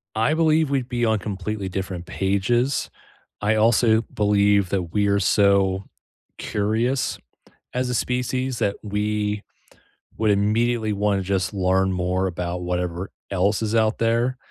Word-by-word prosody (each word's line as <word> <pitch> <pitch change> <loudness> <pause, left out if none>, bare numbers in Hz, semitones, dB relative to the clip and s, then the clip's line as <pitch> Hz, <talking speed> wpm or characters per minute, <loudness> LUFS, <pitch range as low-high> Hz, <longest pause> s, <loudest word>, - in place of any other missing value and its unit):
I 115 +7 +2
believe 160 -1 +3
we'd 135 -3 -1
be 120 -1 0
on 110 -1 +2
completely 100 0 -4
different 95 -2 -4
pages, 100 +8 0 0.5
I 105 +1 +2
also 110 0 +4
believe 100 -2 +3
that 95 -2 0
we 105 -1 +2
are 100 0 +2
so 100 -1 +3 0.5
curious 115 +6 -1 0.5
as 125 0 -1
a 125 - -2
species 125 +1 -1
that 100 0 0
we 105 0 -1 0.8
would 110 -2 +2
immediately 110 +2 +1
wanna 100 -1 0
just 95 +1 -1
learn 95 0 +1
more 90 +1 0
about 90 -1 -3
whatever 90 +1 -3 0.2
else 100 +3 +1
is 110 +1 -1
out 110 0 +2
there. 115 +3 +1
105 Hz, 135 wpm, -23 LUFS, 95-115 Hz, 0.8 s, also